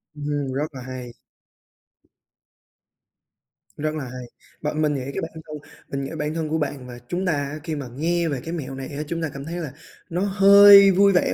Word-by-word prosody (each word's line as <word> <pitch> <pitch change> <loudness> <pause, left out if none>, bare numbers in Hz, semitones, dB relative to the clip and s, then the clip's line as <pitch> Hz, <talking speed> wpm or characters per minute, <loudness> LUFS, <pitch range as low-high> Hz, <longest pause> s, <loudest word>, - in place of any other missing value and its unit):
Ừm, 145 -2 -3
rất 145 +3 -1
là 130 - -7
hay! 125 -1 -8 2.6
Rất 155 +1 -2
là 150 - -4
hay! 125 0 -7 0.4
Bạn 150 +1 -2
mình 150 -1 +2
nghĩ 135 - -3
cái - - -3
bản 160 - -5 0.2
thân 150 - -6 0.3
mình 140 0 -3
nghĩ - - -5
bản 150 +1 -2
thân 160 -2 -3
của 160 - 0
bạn 140 -4 -3
và 120 -1 -9
chúng 180 +6 -2
ta 180 - +2
á, 145 +1 -3
khi 160 -2 -3
mà 140 -4 -5
nghe 170 +4 0
về 140 - -2
cái 165 +2 -5
mẹo 135 -5 -5
này 135 -1 -6
á 145 +1 -5
chúng 165 +2 -3
ta 160 - -1
cảm 140 0 -7
thấy 170 +2 -5
là 160 -6 -5 0.4
nó 175 +2 -2
hơi 200 0 +8
vui 200 +2 +5
vẻ 180 - +2
150 Hz, 210 wpm, -23 LUFS, 140-170 Hz, 2.6 s, hơi